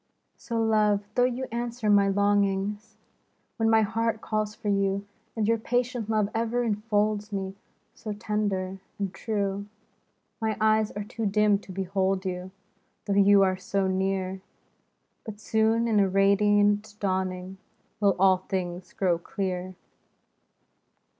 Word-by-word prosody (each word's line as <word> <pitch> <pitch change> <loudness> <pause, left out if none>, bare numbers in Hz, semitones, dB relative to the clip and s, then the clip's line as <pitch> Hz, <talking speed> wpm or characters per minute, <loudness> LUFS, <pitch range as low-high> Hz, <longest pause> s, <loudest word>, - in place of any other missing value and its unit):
So, 230 -2 -4
love, 215 -2 +2
though 245 +2 +3
you 255 +1 -2
answer 235 -1 -3
my 200 -1 +5
longings. 200 +1 0 0.6
When 225 -1 +2
my 225 0 +5
heart 225 +1 -1
calls 215 -1 -2
for - - -8
you, 200 0 0 0.3
And 215 -2 0
your 230 0 +2
patient 245 -1 -1
love 215 -2 +2
ever 230 +2 0
enfolds 210 -1 0
me, 190 -1 -3 0.4
So 220 -2 -7
tender 205 -3 -2 0.2
and 195 -2 -3
true, 200 -2 -2 0.4
— - - -47
My 220 -1 -1
eyes 215 0 +3
are 205 - -4
too 220 +1 -3
dim 205 0 +3
to 200 - -12
behold 190 0 -1
you, 180 0 -4 0.6
Though 200 - 0
you 200 0 +6
are 185 -1 +1
so 195 +1 -1
near; 190 0 -1 0.8
But 210 -2 -8
soon, 220 +1 +1
in 215 -2 +3
a 195 -1 +3
radiant 205 +2 +3
dawning, 185 -1 -2 0.4
Will 200 -2 +3
all 190 0 +5
things 180 -1 -5
grow 180 -3 +1
clear. 185 0 -4
205 Hz, 140 wpm, -27 LUFS, 195-220 Hz, 0.8 s, you